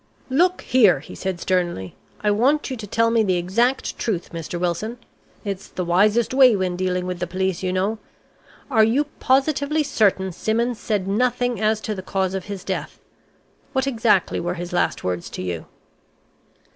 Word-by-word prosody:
"Look 360 +7 +3
here," 215 - +4
he 145 - -11
said 190 -2 -4
sternly, 175 - -1 0.3
"I 210 - +2
want 270 +8 +2
you - - -2
to 220 -3 -8
tell 230 +3 +2
me 230 -1 +3
the 185 -4 +2
exact 230 +9 0
truth, 185 -8 -2
Mr. 165 +1 -5
Wilson. 180 +7 -2 0.5
It's 195 -2 -4
the 180 - -4
wisest 210 +7 +3
way 260 -4 +7
when 185 -2 -1
dealing 180 0 -1
with 180 -1 -4
the 180 - -2
police, 190 0 -1
you 185 -1 -1
know. 195 +4 0 0.7
Are 220 -4 +5
you 235 +7 +3 0.2
positively 285 +3 +2
certain 200 -8 +1
Simmons 230 +6 -1
said 205 -4 -1
nothing 245 +2 0
as 215 0 +2
to 215 - -3
the 190 - -5
cause 190 0 -1
of 190 -1 -4
his 200 -2 -6
death? - - -4 0.7
What 265 -1 +1
exactly 225 -7 +2
were 175 +1 -2
his 175 0 -6
last 175 - 0
words 90 -1 -3
to - - -6
you?" 85 -3 -4
205 Hz, 175 wpm, -22 LUFS, 180-235 Hz, 0.7 s, way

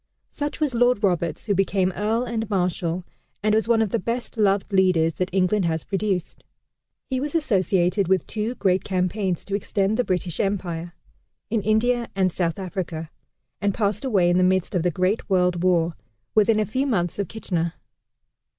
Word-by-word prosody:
Such 290 0 -4
was 300 -5 +1
Lord 245 -2 +3
Roberts 175 -4 0
who 205 - +1
became 190 -1 +1
Earl 220 +3 0
and 225 -3 -3
Marshal, 180 -2 -1 0.4
and 215 0 +3
was 220 +1 +2
one 230 -1 +4
of 210 - -3
the 230 - +1
best 235 +6 -3
loved 200 -2 +1
leaders 180 -4 +3
that 185 0 -1
England 190 +1 +2
has 160 -1 -1
produced. 195 -3 -2 0.6
He 260 -1 -2
was 290 +4 -3
associated 190 - +2
with 190 0 +2
two 225 +3 -3
great 185 -4 +1
campaigns 185 -1 -1
to 200 - -6
extend 200 +1 0
the 250 - +2
British 180 -4 -2
Empire 175 -4 -2 0.6
in 225 -2 +1
India 235 +3 +1
and 190 -2 +2
South 170 -2 -1
Africa 175 -4 -5 0.5
and 200 -1 +1
passed 210 0 0
away 195 -9 +3
in 175 - +3
the - - +4
midst 185 +2 +1
of 180 - +1
the 180 - +2
great 185 +6 -1
World 180 -2 +2
War, 170 -3 +2 0.4
within 215 0 +4
a 215 - +2
few 260 +7 -1
months 175 -7 0
of 200 - -1
Kitchener. 170 -6 -2
195 Hz, 180 wpm, -24 LUFS, 180-220 Hz, 0.6 s, one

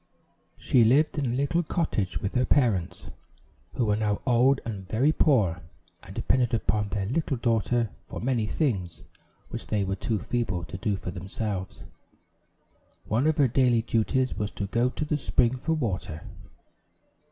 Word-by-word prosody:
She 125 - +3
lived 145 +7 +3
in 140 - 0
a 120 - -1
little 140 +6 +1
cottage 155 - -2
with 100 - -2
her 125 - +2
parents, 115 - +1 0.6
who 120 - +1
were 105 -1 +2
now 105 -1 0
old 130 +2 +4
and 100 -5 -6
very 125 +9 +3
poor, 105 - +2 0.4
and - - -12
depended 120 -2 +1
upon 105 -1 0
their 100 0 -2
little 135 +4 -1
daughter 115 -1 +1 0.2
for - - -6
many 120 -3 0
things 100 - -2 0.5
which - - -7
they 105 -2 0
were 95 0 -1
too 110 +3 -1
feeble 95 -4 -2
to 95 - -7
do 100 0 0
for 90 0 -6
themselves. 95 +1 -5 1.2
One 120 +8 +1
of 155 - +2
her 140 - +5
daily 120 -2 +3
duties 125 +3 +1
was 105 0 -3
to 100 - -3
go 120 +5 +1
to 150 - -4
the 150 0 -1
spring 125 -2 +2
for 160 +6 -1
water. 95 - -3
115 Hz, 165 wpm, -27 LUFS, 100-130 Hz, 1.2 s, her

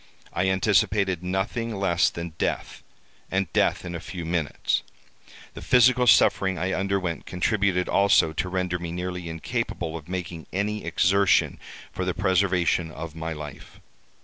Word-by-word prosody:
I 95 +1 +1
anticipated 95 -1 +2
nothing 95 +5 -2
less 85 -4 +2
than 85 -1 -6
death, - - -2 0.5
and 95 0 -1
death - - +1
in 90 - -5
a 85 - -4
few 85 0 -7
minutes. 80 -3 -1 0.7
The - - -9
physical 125 0 +4
suffering 95 -4 +4
I 90 +4 -1
underwent 95 -3 -2
contributed 95 -1 0
also 100 -5 +4
to 90 +3 -2
render 90 -1 -1
me 85 -1 -5
nearly 90 0 -4
incapable 85 -1 -3
of 80 0 -9
making 90 -3 -5
any 105 +2 -2
exertion 95 +3 +2 0.3
for 95 - -4
the 90 -1 -1
preservation 95 -3 +1
of 80 0 -7
my 80 0 -5
life. 75 -2 -10
90 Hz, 145 wpm, -25 LUFS, 85-100 Hz, 0.7 s, physical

